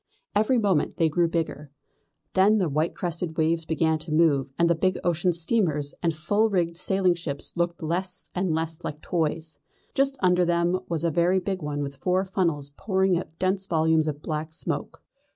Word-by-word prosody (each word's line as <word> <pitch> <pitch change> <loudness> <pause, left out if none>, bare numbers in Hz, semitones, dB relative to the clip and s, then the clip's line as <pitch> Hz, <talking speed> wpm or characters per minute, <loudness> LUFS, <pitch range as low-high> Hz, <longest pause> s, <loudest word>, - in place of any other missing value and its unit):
Every 215 +5 +3
moment 200 -8 +1
they 165 -1 +3
grew 170 +2 +2
bigger. 160 -3 -3 0.6
Then 200 +3 +5
the 190 -4 +1
white 155 +4 0
crested 170 -2 -3
waves 165 0 +1
began 160 0 +1
to 160 +1 -7
move, 145 -4 +3
and 170 - +4
the 170 - +4
big 185 +3 0
ocean 175 +1 +2
steamers 165 -5 0
and 170 - +2
full 205 +8 +1
rigged 170 -4 0
sailing 185 +1 +2
ships 165 -5 -4
looked 170 -1 -1
less 180 +3 -2
and 185 -1 0
less 160 +1 -2
like 150 +1 -5
toys. 160 -1 -2 0.3
Just 275 0 +1
under 180 -1 +3
them 170 0 +2
there 185 - -1
was 165 -2 -1
a 170 - +2
very 175 +4 +3
big 190 0 -3
one 145 -1 -3
with 140 -1 -6
four 185 +5 +1
funnels 165 -7 -1
pouring 190 -2 +1
out 160 -2 -10
dense 190 +1 0
volumes 160 -2 +2
of 150 -1 -4
black 155 0 -3
smoke. - - -4
170 Hz, 190 wpm, -26 LUFS, 155-185 Hz, 0.6 s, Then